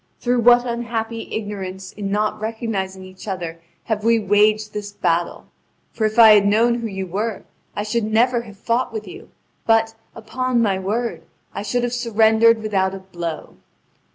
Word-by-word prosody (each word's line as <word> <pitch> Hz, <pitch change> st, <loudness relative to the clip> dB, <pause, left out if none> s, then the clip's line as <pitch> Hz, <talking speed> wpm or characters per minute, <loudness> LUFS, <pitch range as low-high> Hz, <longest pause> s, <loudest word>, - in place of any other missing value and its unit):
Through 245 Hz, 0 st, +1 dB
what 240 Hz, +1 st, +5 dB
unhappy 230 Hz, -1 st, -4 dB
ignorance 190 Hz, -3 st, -5 dB
in 200 Hz, -1 st, -5 dB
not 210 Hz, +1 st, -1 dB
recognising 210 Hz, -4 st, -3 dB
each 185 Hz, +2 st, -13 dB
other 170 Hz, -4 st, -5 dB, 0.2 s
have 215 Hz, -2 st, -2 dB
we 230 Hz, +1 st, +4 dB
waged 210 Hz, +1 st, +2 dB
this 205 Hz, -1 st, -5 dB
battle! 170 Hz, -4 st, -1 dB, 0.5 s
For 220 Hz, -, -1 dB
if 215 Hz, +1 st, -2 dB
I 225 Hz, -2 st, +9 dB
had 205 Hz, -1 st, +6 dB
known 235 Hz, +3 st, +3 dB
who 230 Hz, -, -3 dB
you 190 Hz, -2 st, -4 dB
were, 205 Hz, +4 st, -3 dB, 0.3 s
I 205 Hz, -, -2 dB
should 215 Hz, +1 st, -1 dB
never 235 Hz, +3 st, +2 dB
have 210 Hz, -4 st, -13 dB
fought 235 Hz, +4 st, -1 dB
with 220 Hz, -1 st, -6 dB
you; 390 Hz, +4 st, -11 dB, 0.4 s
but, 225 Hz, 0 st, +3 dB, 0.2 s
upon 255 Hz, +2 st, -2 dB
my 200 Hz, -5 st, +1 dB
word, 225 Hz, +5 st, -2 dB, 0.3 s
I -, -, -4 dB
should 225 Hz, +4 st, -1 dB
have 245 Hz, 0 st, -1 dB
surrendered 225 Hz, -1 st, +3 dB
without 195 Hz, -3 st, 0 dB
a -, -, -7 dB
blow." 175 Hz, -4 st, -7 dB
215 Hz, 170 wpm, -21 LUFS, 200-230 Hz, 0.5 s, I